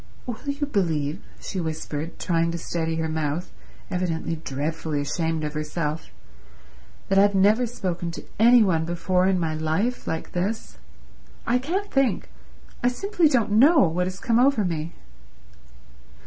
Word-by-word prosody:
"Will 240 Hz, -3 st, -5 dB
you 280 Hz, +1 st, -1 dB
believe," 165 Hz, -, -1 dB, 0.2 s
she 190 Hz, -, -5 dB
whispered, 160 Hz, 0 st, -4 dB
trying 165 Hz, -1 st, +1 dB
to 170 Hz, -, -3 dB
steady 165 Hz, -1 st, -2 dB
her 160 Hz, 0 st, -1 dB
mouth, 155 Hz, +2 st, -2 dB, 0.4 s
evidently 165 Hz, -2 st, -1 dB
dreadfully 150 Hz, +1 st, -3 dB
ashamed 160 Hz, +2 st, -1 dB
of 150 Hz, 0 st, -3 dB
herself, 155 Hz, 0 st, -3 dB, 1.0 s
"that 195 Hz, 0 st, +4 dB
I've 200 Hz, 0 st, +4 dB
never 210 Hz, +6 st, +4 dB
spoken 180 Hz, -7 st, -3 dB
to -, -, -7 dB, 0.2 s
any 235 Hz, +1 st, +7 dB
one 165 Hz, -5 st, +2 dB
before 180 Hz, +2 st, +1 dB
in 190 Hz, -1 st, +2 dB
my 160 Hz, -2 st, -1 dB
life 160 Hz, +11 st, -1 dB
like 160 Hz, -, -3 dB
this? 200 Hz, +5 st, -3 dB, 0.7 s
I 245 Hz, +1 st, +2 dB
can't 375 Hz, +10 st, -3 dB
think, 270 Hz, -6 st, +1 dB, 0.5 s
I -, -, +4 dB
simply 350 Hz, +5 st, +2 dB
don't 230 Hz, -6 st, +2 dB
know, 275 Hz, +9 st, +6 dB
what 180 Hz, +3 st, 0 dB
has 185 Hz, +1 st, -5 dB
come 230 Hz, 0 st, +2 dB
over 250 Hz, -5 st, +4 dB
me." 165 Hz, -1 st, -3 dB
180 Hz, 150 wpm, -24 LUFS, 160-225 Hz, 1.0 s, any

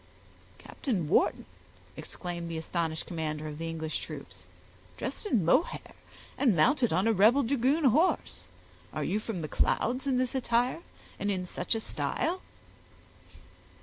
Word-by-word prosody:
"Captain 195 Hz, -, -3 dB
Wharton!" 155 Hz, -, +2 dB, 0.5 s
exclaimed 175 Hz, -2 st, -6 dB
the 165 Hz, -, -3 dB
astonished 160 Hz, 0 st, -2 dB
commander 155 Hz, -2 st, -3 dB
of 150 Hz, 0 st, -7 dB
the 165 Hz, 0 st, -3 dB
English 160 Hz, -1 st, -3 dB
troops, -, -, -9 dB, 0.5 s
"dressed -, -, -4 dB
in 220 Hz, -, +2 dB
mohair, 315 Hz, -, +1 dB, 0.5 s
and 245 Hz, -9 st, +4 dB
mounted 245 Hz, -, +3 dB
on 190 Hz, -, +2 dB
a 225 Hz, -, +4 dB
rebel 220 Hz, +8 st, +5 dB
dragoon 275 Hz, +5 st, +2 dB
horse! 295 Hz, +8 st, +2 dB, 0.5 s
Are -, -, -2 dB
you 210 Hz, -, 0 dB
from 215 Hz, -5 st, -4 dB
the 155 Hz, -, -3 dB
clouds 255 Hz, -, +1 dB
in 260 Hz, -2 st, +2 dB
this 255 Hz, -1 st, 0 dB
attire, 250 Hz, +2 st, +1 dB, 0.4 s
and 205 Hz, -, -1 dB
in 185 Hz, -2 st, -1 dB
such 180 Hz, -, -1 dB
a -, -, 0 dB
style?" 340 Hz, +10 st, -2 dB
215 Hz, 145 wpm, -30 LUFS, 165-255 Hz, 0.5 s, rebel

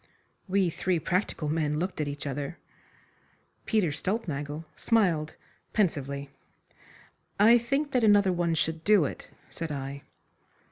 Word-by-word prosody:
We 190 Hz, -2 st, +2 dB
three 180 Hz, +2 st, 0 dB
practical 170 Hz, -1 st, -1 dB
men 150 Hz, -1 st, 0 dB
looked 180 Hz, 0 st, -2 dB
at 150 Hz, -, -1 dB
each 145 Hz, +1 st, -5 dB
other. 140 Hz, +3 st, -4 dB, 1.1 s
Peter 210 Hz, -8 st, +2 dB
Stulpnagel 155 Hz, -4 st, -3 dB
smiled 175 Hz, -9 st, +1 dB, 0.4 s
pensively. 140 Hz, -, -1 dB, 1.1 s
"I 230 Hz, +4 st, +7 dB
think 275 Hz, +5 st, -1 dB
that 250 Hz, -3 st, +2 dB
another 205 Hz, -3 st, +5 dB
one 170 Hz, -1 st, +1 dB
should 160 Hz, 0 st, -1 dB
do 205 Hz, -5 st, +5 dB
it," -, -, -6 dB, 0.2 s
said 165 Hz, -2 st, -4 dB
I. 140 Hz, 0 st, -5 dB
165 Hz, 125 wpm, -28 LUFS, 150-200 Hz, 1.1 s, I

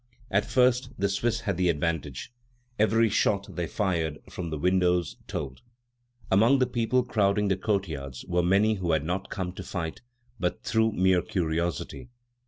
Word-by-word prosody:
At 100 Hz, +2 st, +1 dB
first 125 Hz, 0 st, +3 dB
the 100 Hz, -, +1 dB
Swiss 110 Hz, +4 st, 0 dB
had 100 Hz, -4 st, -2 dB
the 90 Hz, -1 st, +2 dB
advantage. 75 Hz, -, -2 dB, 0.5 s
Every 115 Hz, +1 st, +4 dB
shot 100 Hz, -1 st, 0 dB
they 85 Hz, -2 st, -2 dB
fired 80 Hz, -5 st, -1 dB
from 85 Hz, -2 st, -5 dB
the 80 Hz, -, -3 dB
windows 90 Hz, 0 st, +2 dB
told. 65 Hz, -2 st, -5 dB, 0.7 s
Among 115 Hz, +8 st, +5 dB
the 130 Hz, -, +3 dB
people 125 Hz, +1 st, +1 dB
crowding 105 Hz, -3 st, +1 dB
the 95 Hz, -, +3 dB
courtyards 80 Hz, -, -3 dB
were 90 Hz, -1 st, +2 dB
many 100 Hz, +5 st, +3 dB
who 90 Hz, -5 st, -1 dB
had 80 Hz, -2 st, +1 dB
not 90 Hz, +3 st, -3 dB
come 95 Hz, -3 st, -3 dB
to 95 Hz, -, -8 dB
fight, 80 Hz, -3 st, -5 dB, 0.4 s
but 90 Hz, -1 st, -2 dB
through 110 Hz, -1 st, +2 dB
mere 95 Hz, -1 st, +3 dB
curiosity. 85 Hz, +4 st, -2 dB
95 Hz, 160 wpm, -27 LUFS, 85-110 Hz, 0.7 s, Among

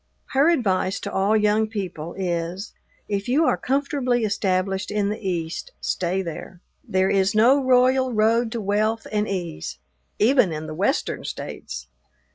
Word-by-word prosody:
Her 275 Hz, +5 st, +4 dB
advice 195 Hz, -, +1 dB
to -, -, -5 dB
all 200 Hz, +3 st, +3 dB
young 210 Hz, +1 st, +2 dB
people 180 Hz, -7 st, -5 dB
is, 175 Hz, +2 st, -3 dB, 0.3 s
if 200 Hz, -1 st, -2 dB
you 300 Hz, +6 st, +3 dB
are -, -, +3 dB
comfortably 265 Hz, -3 st, 0 dB
established 190 Hz, -2 st, 0 dB
in 205 Hz, -1 st, 0 dB
the 210 Hz, -, -3 dB
East, 180 Hz, -, -4 dB
stay 185 Hz, +1 st, -1 dB
there. 170 Hz, +1 st, -7 dB, 0.2 s
There 185 Hz, 0 st, +1 dB
is 195 Hz, +1 st, +2 dB
no 255 Hz, +6 st, +5 dB
royal 255 Hz, 0 st, +4 dB
road 225 Hz, +1 st, +2 dB
to 230 Hz, -, -3 dB
wealth 215 Hz, +3 st, 0 dB
and 210 Hz, 0 st, 0 dB
ease, 170 Hz, -, -4 dB, 0.4 s
even 240 Hz, -4 st, +4 dB
in 155 Hz, 0 st, -4 dB
the 155 Hz, -, -6 dB
Western -, -, -1 dB
States! 60 Hz, 0 st, -6 dB
205 Hz, 150 wpm, -23 LUFS, 185-235 Hz, 0.4 s, no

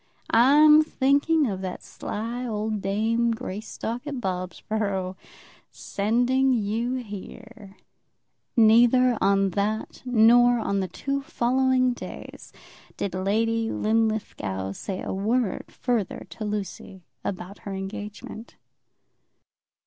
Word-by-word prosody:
"I'm 300 Hz, +6 st, +7 dB
thinking 290 Hz, +2 st, +2 dB
of 195 Hz, -6 st, -3 dB
that 185 Hz, -1 st, -5 dB
sly 230 Hz, +4 st, -5 dB
old 215 Hz, -1 st, -2 dB
dame 220 Hz, +4 st, +1 dB
Greystock 225 Hz, +5 st, -5 dB
at 290 Hz, -, -3 dB
Bobsborough, 190 Hz, 0 st, -3 dB, 0.5 s
sending 245 Hz, +6 st, +1 dB
you 230 Hz, +2 st, -1 dB
here!" 220 Hz, -2 st, -9 dB, 0.8 s
Neither 240 Hz, +3 st, +5 dB
on 195 Hz, -1 st, +3 dB
that 210 Hz, +4 st, -2 dB
nor 240 Hz, 0 st, +5 dB
on 200 Hz, -3 st, -1 dB
the 190 Hz, -, -1 dB
two 275 Hz, +9 st, -3 dB
following 255 Hz, 0 st, +1 dB
days -, -, -10 dB, 0.5 s
did 200 Hz, -, -3 dB
Lady 225 Hz, +4 st, 0 dB
Linlithgow 215 Hz, -, -1 dB
say 185 Hz, -, -5 dB
a -, -, -3 dB
word 215 Hz, +2 st, 0 dB
further 235 Hz, -7 st, -2 dB
to 215 Hz, -, -6 dB
Lucy 200 Hz, -2 st, -5 dB, 0.2 s
about 190 Hz, +1 st, -5 dB
her 200 Hz, -, -7 dB
engagement. 205 Hz, +3 st, -7 dB
220 Hz, 105 wpm, -25 LUFS, 200-245 Hz, 0.8 s, I'm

